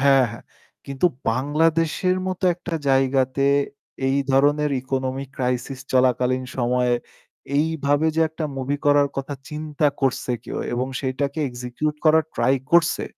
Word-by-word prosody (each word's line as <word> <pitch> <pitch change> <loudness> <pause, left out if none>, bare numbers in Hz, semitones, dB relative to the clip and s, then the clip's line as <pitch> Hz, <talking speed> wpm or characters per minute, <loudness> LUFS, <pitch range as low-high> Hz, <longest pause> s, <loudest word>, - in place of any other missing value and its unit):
হ্যাঁ, 135 -1 +5
হ্যাঁ। 115 - -10 0.4
কিন্তু 140 +5 +1 0.2
বাংলাদেশের 160 +7 +1
মত 185 -1 -3
একটা 175 -1 -6
জায়গাতে 135 0 +2 0.7
এই 135 - +2
ধরনের 145 +2 +3
economic 130 0 -3
crisis 125 +1 -2
চলাকালীন 130 0 +2
সময়ে 125 0 +1 0.6
এইভাবে 150 -1 +1
যে 165 - +3
একটা 160 0 -5
মুভি 135 +2 -1
করার 145 0 +5
কথা 135 +1 -3
চিন্তা 150 -1 -1
করছে 135 -2 0
কেউ - - -5
এবং 125 +2 -1
সেটাকে 140 +2 -2
এক্সিকিউট 125 +5 -3
করার 160 0 +5
ট্রাই 135 - +2 0.2
করছে 170 -2 +4
135 Hz, 125 wpm, -23 LUFS, 130-150 Hz, 0.7 s, হ্যাঁ